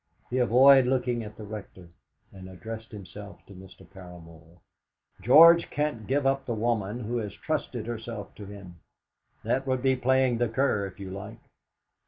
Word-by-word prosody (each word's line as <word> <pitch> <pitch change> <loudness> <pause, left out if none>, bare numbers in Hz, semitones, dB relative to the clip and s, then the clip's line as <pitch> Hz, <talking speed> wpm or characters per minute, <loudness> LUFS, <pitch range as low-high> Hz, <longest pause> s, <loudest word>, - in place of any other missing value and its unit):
He 130 - 0
avoided 130 +2 +6
looking 125 -2 -1
at 105 0 -11
the 110 - -9
Rector, 100 -4 -10 0.4
and 95 -1 -11
addressed 110 +5 -9
himself 100 0 -11
to 100 - -14
Mr. 95 0 -14
Paramor. 85 -3 -14 0.6
"George 165 - +7
can't 145 -8 -3
give 140 +1 0
up 135 0 0
the 120 - -2
woman 110 0 -2
who 120 +2 -3
has 105 -3 -4
trusted 140 -7 -4
herself 115 -2 -7
to 105 - -11
him; 95 -4 -12 0.6
that 135 +1 -1
would 130 -1 -1
be 130 -1 +3
playing 130 -1 +1
the 120 -2 +1
cur, 115 -4 0
if 95 - -14
you 95 -1 -7
like. 100 +4 -8
110 Hz, 165 wpm, -27 LUFS, 100-130 Hz, 0.6 s, George